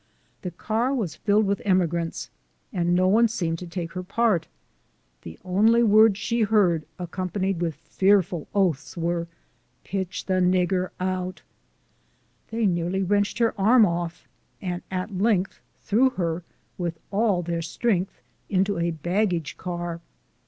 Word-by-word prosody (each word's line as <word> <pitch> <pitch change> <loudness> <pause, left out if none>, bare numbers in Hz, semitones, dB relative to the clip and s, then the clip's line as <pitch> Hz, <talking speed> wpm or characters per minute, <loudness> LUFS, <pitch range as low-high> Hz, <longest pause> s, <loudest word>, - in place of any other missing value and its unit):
The 180 - -4
car 225 - -1
was 205 - -2
filled 210 0 +2
with 200 0 0
emigrants, 170 -4 0 0.4
and 175 -2 +1
no 185 +1 +3
one 225 +5 +5
seemed 170 -7 -2
to 180 - -7
take 170 -1 -5
her 185 - -3
part. 200 -1 +1 0.7
The 80 - -10
only 220 +6 +4
words 215 -1 +6
she 230 +2 -1
heard, 195 -7 +3
accompa 180 +1 -4
nied 190 -2 0
with 165 -3 -1
fearful 180 +1 +1
oaths, 180 -6 0
were, 170 0 -1 0.3
" - - -42
Piti'h 190 -2 -3
the 185 -1 +1
nagur 180 0 +2
out! 185 0 -3 0.5
" - - -41
They 225 0 0
nearly 180 +1 0
wrenched 205 +2 +1
her 230 -1 +2
arm 225 +3 +6
off, 170 -2 -3 0.3
and 180 -2 -4
at 190 +2 -3
length 195 -1 +1 0.2
threw 240 +5 +3
her, 170 -6 -2 0.4
with 170 -2 -2
all 200 -3 +2
their 170 0 -2
strength, 190 +2 -1 0.3
into 195 -1 +1
a 170 0 +1
baggage 175 -1 -1
car. 175 -1 -5
185 Hz, 145 wpm, -25 LUFS, 175-205 Hz, 0.7 s, words